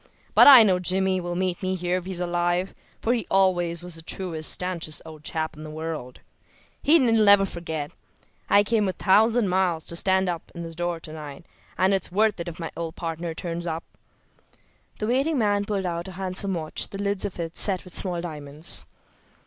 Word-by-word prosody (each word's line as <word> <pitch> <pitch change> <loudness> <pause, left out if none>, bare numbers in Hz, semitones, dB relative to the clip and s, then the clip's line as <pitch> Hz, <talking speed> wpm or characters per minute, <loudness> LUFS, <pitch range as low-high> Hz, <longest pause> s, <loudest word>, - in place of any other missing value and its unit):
But - - +8
I 265 -5 +11
know 185 -4 +2
Jimmy 185 +1 +1
will 175 0 -4
meet 185 +1 -1
me 185 0 -1
here 180 0 -1
if 180 - -6
he's 185 -2 -3
alive, 175 +1 -1 0.3
for 235 - +2
he 230 -7 -2
always 175 -3 +1
was 180 -1 -6
the 165 - -7
truest, 165 -2 -1
stanchest 175 -4 -2
old 155 -2 -11
chap 160 0 -3
in 150 - -11
the 155 - -8
world. 155 -5 -6 0.6
He'll 285 -6 +4
never 205 -3 +6
forget. 160 -5 -5 0.6
I 205 - +5
came 210 -2 +1
a - - -2
thousand 220 +3 +3
miles 180 -3 0
to 170 - -4
stand 190 +2 +3 0.3
in 170 - -6
this 165 0 -7
door 175 0 -3
to 155 - -9
night, 150 0 -9 0.3
and 190 +1 +3
it's 190 -2 -1
worth 210 +1 +2
it 170 - -5
if 170 0 -7
my 165 - -5
old 165 -1 -5
partner 165 0 -5
turns 170 0 -4
up." 165 0 -3 1.1
The 215 - -3
waiting 270 +7 +1
man 205 -3 +1
pulled 200 -2 -2
out 170 0 -3
a 190 - -8
handsome 190 +1 -1
watch, 155 -2 -1
the 195 - -7
lids 200 -1 -1
of 195 -3 -4
it 165 -1 -5
set 190 -3 +3
with 180 - -12
small 180 -3 +2
diamonds. 150 -2 -2
180 Hz, 195 wpm, -25 LUFS, 165-195 Hz, 1.1 s, I